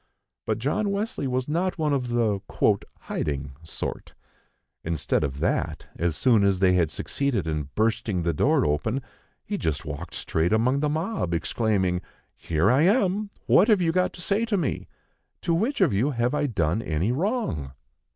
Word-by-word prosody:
But - - +1
John 145 - 0
Wesley 200 -7 -2
was 130 0 -1
not 175 +5 0
one 155 -3 +1
of 125 -3 -1
the 115 -4 +1 0.6
"hiding" 70 -1 -3
sort. 80 - -5 0.7
Instead 80 -2 0
of 70 -1 -3
that, - - -1
as 85 -1 -1
soon 115 - +4
as 100 -1 +3
they 90 0 +4
had 85 -4 +3
succeeded 135 - -1
in 75 -3 -2
bursting 110 -4 0
the 85 0 +1
door - - +3
open, 75 - 0 0.4
he - - -3
just 80 -2 -2
walked 75 +3 -6
straight 80 +5 0
among 125 +5 +2
the 150 0 +1
mob, 155 - -1
exclaiming: 95 -2 0 0.3
"Here 85 +7 +1
I 130 +3 +4
am! 200 +2 +2 0.2
What 210 - +5
have 215 -4 +5
you 170 -2 +2
got 180 +2 +1
to 175 - -9
say 200 +5 +1
to 220 -3 0
me? 155 -8 -2 0.5
To 170 - 0
which 225 +12 0
of - - +4
you 110 +9 +2
have 120 -1 0
I 145 0 +1
done 95 - 0
any 85 +4 0
wrong?" 130 - -1
115 Hz, 170 wpm, -25 LUFS, -, 0.7 s, What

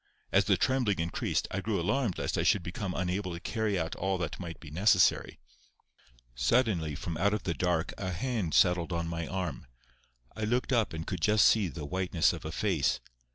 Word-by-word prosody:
As - - +4
the - - +3
trembling 125 -6 +1
increased, 85 +1 -1
I 95 - -2
grew 105 -1 -1
alarmed 110 +4 0
lest - - -2
I - - +1
should 100 - +2
become 90 +2 -4
unable 90 +1 -2
to 85 - -6
carry 110 0 -1
out 80 -1 -2
all 95 +1 0
that 85 -4 -4
might 85 -3 -7
be 80 -4 -11
necessary. 90 +2 +3 1.0
Suddenly 80 - +1
from 80 +2 -5
out 100 +4 +2
of 105 - -5
the 85 - -1
dark 85 -2 0
a 95 - -3
hand 105 -2 -2
settled 90 -1 +3
on 85 -1 -1
my 85 -1 -3
arm. 90 -9 -4 0.7
I 110 - -4
looked 125 +4 0
up 115 -7 +1
and 80 0 -5
could 90 -4 -4
just 105 +2 +4
see 105 -4 +4
the 80 -3 -6
whiteness 90 0 +1
of - - -8
a - - -4
face. - - 0
90 Hz, 200 wpm, -30 LUFS, 85-105 Hz, 1.0 s, As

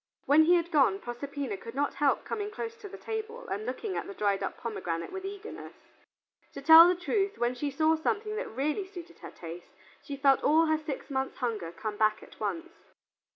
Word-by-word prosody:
When 305 +3 +6
he 350 +2 +6
had 340 0 0
gone, 270 - +4
Proserpina 250 -1 -5
could 230 +5 -10
not 285 +1 0
help 280 0 +1
coming 415 -1 -3
close 455 +1 -5
to 420 -3 -10
the - - -9
table 450 +2 -5
and 215 +3 -4
looking 375 - -3
at - - -3
the 395 - -8
dried 200 - +1
up - - -3
pomegranate 170 -8 -4
with 380 0 -6
eagerness. 405 +2 -8 0.8
To - - -7
tell 320 +3 +10
the 360 - +3
truth, 390 +3 -1
when 240 +1 +1
she 285 +4 -3
saw 315 +3 +2
something 425 +6 -1
that 460 - -3
really 300 - -2
suited 350 -3 -11
her - - -9
taste, 170 +1 -9 0.3
she 280 - -7
felt 275 -1 +4
all 315 +3 +5
her 315 -1 +2
six 300 -2 -6
months' 265 0 -2
hunger 215 -9 -2
come 210 +4 -5
back 215 0 +2
at - - -16
once. 330 +11 -3
300 Hz, 205 wpm, -29 LUFS, 240-375 Hz, 0.8 s, tell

